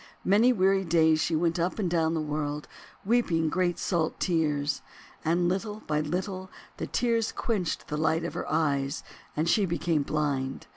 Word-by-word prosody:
Many 215 Hz, +6 st, +5 dB
weary 195 Hz, -3 st, +3 dB
days 160 Hz, -2 st, +4 dB
she 165 Hz, -, +1 dB
went 170 Hz, +2 st, +1 dB
up 175 Hz, +2 st, 0 dB
and 205 Hz, -4 st, 0 dB
down 165 Hz, -1 st, +1 dB
the 160 Hz, -, 0 dB
world, 150 Hz, -1 st, -3 dB, 0.4 s
weeping 180 Hz, -8 st, +2 dB
great 180 Hz, +1 st, 0 dB
salt 165 Hz, -4 st, -1 dB
tears. 150 Hz, -4 st, 0 dB, 0.4 s
And 175 Hz, +2 st, +2 dB
little 205 Hz, +4 st, -2 dB
by 150 Hz, 0 st, 0 dB
little 185 Hz, +4 st, -3 dB, 0.3 s
the -, -, -4 dB
tears 230 Hz, -2 st, +1 dB
quenched 200 Hz, -8 st, -2 dB
the 150 Hz, -, -3 dB
light 160 Hz, +1 st, +1 dB
of 170 Hz, -, -3 dB
her -, -, -4 dB
eyes, 145 Hz, -2 st, 0 dB, 0.3 s
and 155 Hz, +2 st, +1 dB
she 200 Hz, +3 st, +3 dB
became 170 Hz, -2 st, 0 dB
blind. 140 Hz, -3 st, -2 dB
165 Hz, 165 wpm, -28 LUFS, 155-185 Hz, 0.4 s, Many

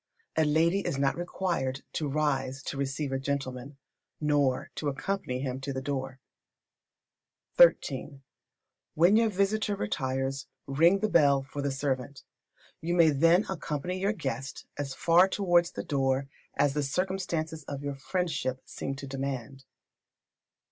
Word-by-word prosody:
A 160 Hz, -, +3 dB
lady 165 Hz, +5 st, +3 dB
is 175 Hz, -7 st, -2 dB
not 135 Hz, 0 st, +1 dB
required 170 Hz, -6 st, -2 dB
to 155 Hz, -, -1 dB
rise 135 Hz, -2 st, -1 dB
to -, -, -4 dB
receive 140 Hz, +1 st, -2 dB
a 135 Hz, -, -1 dB
gentleman, 135 Hz, 0 st, -4 dB, 0.4 s
nor 145 Hz, -4 st, +1 dB
to 150 Hz, -, -2 dB
accompany 135 Hz, -3 st, -3 dB
him 130 Hz, -1 st, -3 dB
to 140 Hz, -, -3 dB
the 130 Hz, -, -3 dB
door. 135 Hz, -1 st, -4 dB, 1.7 s
xiii. 135 Hz, 0 st, -6 dB, 0.7 s
When 175 Hz, +6 st, +5 dB
your 225 Hz, 0 st, +4 dB
visitor 205 Hz, +1 st, +1 dB
retires, 135 Hz, -, -2 dB, 0.2 s
ring 165 Hz, +8 st, +4 dB
the 215 Hz, -, +2 dB
bell 140 Hz, -8 st, +4 dB
for 140 Hz, +1 st, -6 dB
the 140 Hz, -, 0 dB
servant. 135 Hz, 0 st, -3 dB, 0.6 s
You 170 Hz, +2 st, -1 dB
may 165 Hz, -3 st, +6 dB
then 165 Hz, +7 st, +4 dB
accompany 180 Hz, 0 st, -3 dB
your 200 Hz, +3 st, +1 dB
guest 135 Hz, -, -5 dB
as 135 Hz, -2 st, -4 dB
far 175 Hz, +3 st, +5 dB
towards 175 Hz, -3 st, +2 dB
the -, -, -4 dB
door 135 Hz, -1 st, 0 dB, 0.3 s
as 140 Hz, 0 st, +3 dB
the 150 Hz, -, 0 dB
circumstances 165 Hz, 0 st, -2 dB
of 140 Hz, 0 st, -6 dB
your 145 Hz, 0 st, -2 dB
friendship 140 Hz, -4 st, -2 dB
seem 135 Hz, -, -5 dB
to 140 Hz, -, -7 dB
demand. 135 Hz, 0 st, -5 dB
145 Hz, 140 wpm, -29 LUFS, 135-170 Hz, 1.7 s, may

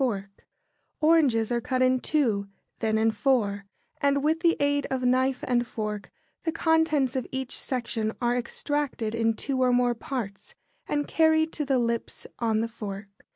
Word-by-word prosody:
] -, -, -48 dB
Oranges 290 Hz, -8 st, +3 dB
are 240 Hz, 0 st, +1 dB
cut 255 Hz, +1 st, 0 dB
in 255 Hz, 0 st, +3 dB
two, 230 Hz, -10 st, +1 dB, 0.3 s
then 220 Hz, -1 st, +1 dB
in 225 Hz, +1 st, +3 dB
four, 210 Hz, -3 st, 0 dB, 0.3 s
and 280 Hz, 0 st, +2 dB
with 315 Hz, +2 st, +2 dB
the 335 Hz, 0 st, +3 dB
aid 285 Hz, 0 st, +1 dB
of 260 Hz, -1 st, -2 dB
knife 255 Hz, +1 st, +2 dB
and 240 Hz, -1 st, +1 dB
fork 210 Hz, -3 st, -4 dB, 0.3 s
the 325 Hz, -, -1 dB
contents 320 Hz, -5 st, +2 dB
of 260 Hz, -, -2 dB
each 265 Hz, -1 st, -1 dB
section 230 Hz, -4 st, -2 dB
are 240 Hz, 0 st, +1 dB
extracted 250 Hz, -2 st, -2 dB
in 225 Hz, -1 st, +1 dB
two 265 Hz, +3 st, -2 dB
or 250 Hz, -1 st, +4 dB
more 245 Hz, 0 st, +3 dB
parts, 235 Hz, -, -6 dB, 0.3 s
and 290 Hz, 0 st, -1 dB
carried 315 Hz, 0 st, +3 dB
to 300 Hz, -, -2 dB
the 270 Hz, -1 st, +2 dB
lips 235 Hz, -1 st, -2 dB
on 220 Hz, -2 st, +1 dB
the 230 Hz, -, -1 dB
fork. 205 Hz, -3 st, -7 dB
250 Hz, 165 wpm, -27 LUFS, 225-285 Hz, 0.3 s, or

